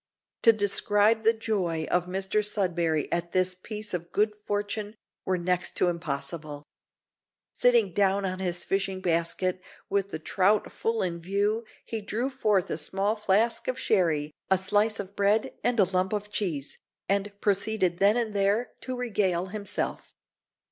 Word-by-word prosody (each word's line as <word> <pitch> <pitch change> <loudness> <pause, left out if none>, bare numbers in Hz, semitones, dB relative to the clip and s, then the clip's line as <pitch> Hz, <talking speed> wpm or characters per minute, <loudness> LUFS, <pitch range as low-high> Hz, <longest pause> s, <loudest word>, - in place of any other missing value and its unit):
To 230 - +8
describe 210 +1 +2
the 225 +1 +5
joy 195 -8 -1
of 180 0 +2
Mr 190 +3 0
Sudberry 175 -7 0
at 170 0 -2
this 185 0 +2
piece 210 +3 -7
of 170 -1 -4
good 210 +1 +2
fortune 210 0 -3 0.3
were 185 -1 +1
next 180 0 -1
to 180 - +2
impossible. 150 -2 -4 0.9
Sitting 235 -7 +3
down 195 +1 +2
on 185 0 -3
his 180 -2 0
fishing 195 -1 -1
basket, 180 +1 0 0.3
with 200 -1 +1
the 160 - -4
trout 195 +6 +1
full 225 -2 -1
in 170 -2 -2
view, 205 +5 0 0.2
he 225 -1 -4
drew 230 +6 -2
forth 210 -8 +1
a 155 - -1
small 195 +7 0
flask 215 +2 +1
of 255 - -1
sherry, 160 -10 +1 0.2
a 190 - +5
slice 205 +3 +1
of 200 0 -6
bread, 205 +2 +2
and 245 -2 +1
a - - +8
lump 185 +1 0
of 210 0 -3
cheese, 160 -10 -3 0.3
and 200 +1 0
proceeded 200 -3 +1
then 205 +4 +5
and 230 -3 -1
there 200 +4 +1
to 255 -1 -4
regale 200 -7 0
himself. 205 -2 -3
200 Hz, 155 wpm, -27 LUFS, 180-215 Hz, 0.9 s, To